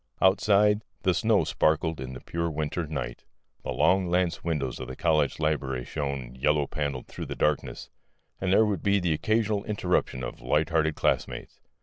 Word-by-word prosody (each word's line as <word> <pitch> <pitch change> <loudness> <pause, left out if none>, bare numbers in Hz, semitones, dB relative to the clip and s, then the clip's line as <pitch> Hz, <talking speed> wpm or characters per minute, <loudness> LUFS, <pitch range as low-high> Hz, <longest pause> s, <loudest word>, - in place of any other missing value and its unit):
Outside, 105 +2 +4 0.2
the - - +3
snow - - +3
sparkled 80 -1 +1
in 65 0 -6
the 65 - -9
pure 85 0 -2
winter 80 +2 -2
night; 65 -6 -5 0.4
the - - -7
long 95 -1 +3
lance 90 -1 0
windows 75 -7 -2
of 65 - -6
the 65 - -7
college 75 -4 +1
library 70 -5 -1
shone 70 -4 -4
yellow 75 +3 +1
panelled 70 -3 -3
through - - -7
the - - -5
darkness, 75 -1 -1 0.5
and 95 -1 -1
there 110 +3 +5
would 100 -6 -1
be 100 0 +3
the 90 -3 +1
occasional 110 +3 0
interruption 90 - -1
of - - -6
light 75 +6 +1
hearted 80 -1 +2
classmates. - - -1
80 Hz, 175 wpm, -27 LUFS, 70-95 Hz, 0.5 s, there